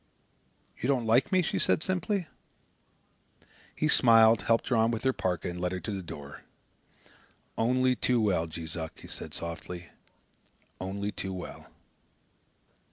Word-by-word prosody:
"You 125 - -1
don't 130 -4 +1
like 120 +4 +3
me," 185 -1 +4
she - - -1
said - - +2
simply. 185 +1 -1 1.5
He - - +1
smiled, 115 -1 +6
helped 115 0 +1
her 125 - +2
on 115 0 +4
with 115 -1 -2
her 130 -1 +3
PARKA, 90 -6 -2
and 90 0 -5
led 90 0 -1
her 90 - -2
to 90 +5 -5
the 100 -2 -3
door. 70 -5 -9 1.1
"Only 130 +2 +2
too 125 0 +1
well, 95 -7 +1
Jees 80 -1 -6
Uck," 80 -1 -6
he - - -11
said - - -8
softly; 85 +1 -6 0.9
"only 100 +2 -3
too 95 -1 -4
well." 90 - -8
110 Hz, 150 wpm, -29 LUFS, 90-125 Hz, 1.5 s, smiled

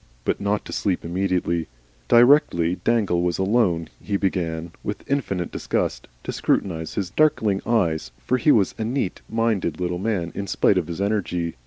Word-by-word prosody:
But - - 0
not 100 +1 0
to - - -7
sleep 95 -5 -1
immediately. 85 -2 -1 0.4
Directly 120 - +5
Dangle 105 -7 +2
was 90 0 0
alone 95 -5 +1
he 100 -1 -1
began, 85 -4 -2
with 105 - -5
infinite 100 -11 -1
disgust, - - -2 0.2
to - - -3
scrutinise 80 -4 -1
his 95 -4 -2
darkling 110 -10 +2
eye, 95 -9 +2 0.3
for 130 - +1
he 150 - +4
was 100 -8 +3
a - - 0
neat 115 -4 -2
minded 110 -8 0
little 90 -1 -2
man 95 -5 -1
in 100 - -4
spite 95 - +3
of 85 - -4
his 85 +2 -5
energy. 90 -5 -1
95 Hz, 165 wpm, -23 LUFS, 85-110 Hz, 0.4 s, Directly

